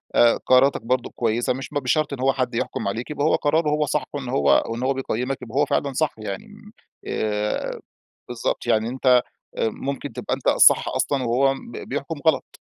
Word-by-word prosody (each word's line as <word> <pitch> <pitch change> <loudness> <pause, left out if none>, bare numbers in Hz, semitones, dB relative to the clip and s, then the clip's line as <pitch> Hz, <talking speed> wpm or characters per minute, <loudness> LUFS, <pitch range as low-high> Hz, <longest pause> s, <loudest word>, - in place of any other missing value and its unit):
آآ 120 -1 +5
قراراتك 130 +2 +4
برضه 125 +1 -1
كويسة، 120 +1 0
مش 135 +1 -6
ب - - -14
بشرط 145 +2 0
إن 135 - -5
هو 135 +1 +2
حد 125 -2 -2
يحكُم 115 - -2
عليك 115 +8 -3
يبقى 145 -1 -1
هو 155 - +4
قراره 150 +1 +1
هو 150 0 +1
صح 150 +1 0
وإنه 135 -4 -4
هو 70 -1 +3
وإنه 120 +3 -3
هو 135 - +2
بيقيّمك 130 0 -2
يبقى 120 0 -9
هو 145 - +4
فعلًا 140 0 -1
صح. 155 +3 0
يعني 160 - -6 0.6
آآ 105 0 -2 0.5
بالضبط، 120 0 -3
يعني 110 -1 +2
أنت 130 +2 -6 0.5
آآ، - - +2
ممكن 135 +5 -5
تبقى - - -3
أنت - - -4
الصح - - +6
أصلًا 140 -2 0
وهو 135 +3 +2
ب 235 - -11 0.2
بيحكُم - - -4
غلط. - - +1
130 Hz, 195 wpm, -23 LUFS, 115-140 Hz, 0.6 s, الصح